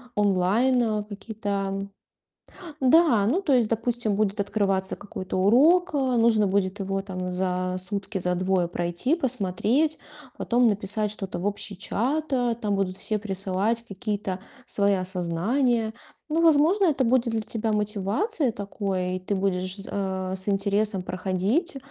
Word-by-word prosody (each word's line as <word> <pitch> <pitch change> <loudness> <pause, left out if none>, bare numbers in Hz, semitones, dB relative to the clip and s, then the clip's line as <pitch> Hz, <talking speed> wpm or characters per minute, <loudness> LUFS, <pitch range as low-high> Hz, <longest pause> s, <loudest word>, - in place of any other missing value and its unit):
онлайн 210 +3 +2
какие-то 200 -2 -4 0.9
Да! 260 -6 +5
Ну, 325 - +1
то 290 -7 +2
есть, 240 -4 +3
допустим, 230 -1 0
будет 205 0 0
открываться 195 -2 0
какой-то 185 -2 -6
урок, 305 - +4
а, 260 -4 +1
нужно 225 -3 +4
будет 190 +1 0
его 195 0 -2
там 185 -2 -5
за 185 0 -1
сутки, 200 +2 -2
за 180 -1 0
двое 185 -1 +1
пройти, 175 - -1
посмотреть, 255 - 0 0.4
потом 245 0 +3
написать 210 0 +1
что-то 195 -3 -4
в 180 - -4
общий 205 -1 -2
чат. 280 +10 -1
А, 245 -2 +1
там 210 -3 -1
будут 190 -1 -1
все 215 +1 0
присылать 200 +3 -1
какие-то 200 -2 -3 0.3
свои 200 0 +1
осознания. 195 +7 0 0.4
Ну, 320 +2 +1
возможно, 330 +5 +4
это 285 -6 +2
будет 240 0 +2
для 225 - 0
тебя 220 0 -2
мотивацией 210 - 0
такой, 195 -3 -3
и - - -7
ты 185 +3 -3
будешь 185 0 -1
з 195 - -8
э, 190 -1 -3
с 190 +2 -4
интересом 200 0 0
проходить. 195 - -1
205 Hz, 140 wpm, -25 LUFS, 190-240 Hz, 0.9 s, Да